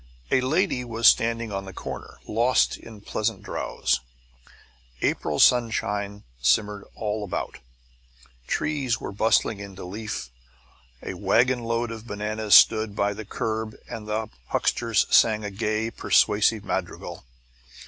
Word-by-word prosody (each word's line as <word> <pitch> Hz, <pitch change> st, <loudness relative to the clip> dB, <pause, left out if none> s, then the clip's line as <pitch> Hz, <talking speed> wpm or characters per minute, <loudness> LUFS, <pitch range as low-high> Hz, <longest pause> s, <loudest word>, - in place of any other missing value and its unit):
A 130 Hz, -, +4 dB
lady 150 Hz, 0 st, +1 dB
was 115 Hz, -1 st, +2 dB
standing 115 Hz, -1 st, +3 dB
on 95 Hz, 0 st, -4 dB
the 95 Hz, -, -9 dB
corner, -, -, -7 dB
lost 120 Hz, +4 st, +2 dB
in 110 Hz, -3 st, -12 dB
pleasant 110 Hz, 0 st, -2 dB
drowse. 60 Hz, -1 st, -1 dB, 1.0 s
April 75 Hz, -1 st, 0 dB
sunshine 105 Hz, -4 st, +2 dB, 0.2 s
shimmered 100 Hz, +11 st, +2 dB
all 105 Hz, 0 st, -3 dB
about: 100 Hz, -, -4 dB, 0.9 s
trees 140 Hz, -6 st, -1 dB
were -, -, -6 dB
bustling 110 Hz, +1 st, +2 dB
into 100 Hz, -2 st, -8 dB
leaf, 100 Hz, -, -5 dB, 0.7 s
a -, -, -4 dB
wagonload 120 Hz, -1 st, +1 dB
of 115 Hz, 0 st, -8 dB
bananas 105 Hz, 0 st, +1 dB
stood 110 Hz, -2 st, +6 dB
by 100 Hz, 0 st, +1 dB
the 105 Hz, +1 st, -8 dB
curb 110 Hz, +1 st, -3 dB
and 110 Hz, -2 st, -7 dB
the 110 Hz, +1 st, -2 dB, 0.2 s
huckster 115 Hz, -2 st, -1 dB
sang 110 Hz, 0 st, +4 dB
a 105 Hz, -, -4 dB
gay, 110 Hz, +3 st, -1 dB
persuasive 105 Hz, -1 st, +2 dB
madrigal. -, -, -4 dB
110 Hz, 125 wpm, -25 LUFS, 105-115 Hz, 1.0 s, stood